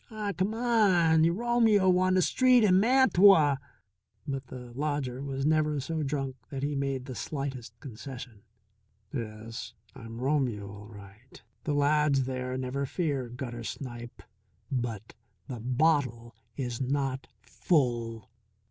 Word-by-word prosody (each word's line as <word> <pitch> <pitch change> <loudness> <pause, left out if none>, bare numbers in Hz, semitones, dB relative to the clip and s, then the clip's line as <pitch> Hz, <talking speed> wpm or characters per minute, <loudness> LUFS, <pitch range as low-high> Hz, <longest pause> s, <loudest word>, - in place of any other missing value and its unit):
"Aw, 210 -3 -3
c'mon, 195 -6 +3
yuh 165 - +4
Romeo 220 -3 +3
on 185 0 +2
th' 185 - +4
street 255 -2 +4
in 185 -3 +5
Mantua." 195 - +5 0.7
But 135 -2 -4
the 125 -2 -9
lodger 140 -2 -2
was 135 -1 -3
never 155 -1 +2
so 160 +4 -3
drunk 135 -2 -3
that 135 -1 -5
he 145 +1 -1
made 135 -2 -2
the 130 - -6
slightest 130 -5 -5
concession. 125 -4 -9 0.7
"Yes, 115 -1 -6 0.2
I'm 115 0 -9
Romeo 125 -7 0
all 105 +1 -11
right 105 +3 -14 0.3
the 150 - 0
lad's 145 -1 +3
there, 130 0 -3
never 130 +2 -2
fear, 140 -7 -2
gutter 120 -1 -6
snipe. 120 -1 -7 0.5
But 115 -5 -3 0.3
the 125 -3 -6
bottle 125 -2 0 0.2
is 125 -2 -3
not 135 0 -1 0.2
full." 115 - -1
135 Hz, 130 wpm, -29 LUFS, 120-160 Hz, 0.7 s, in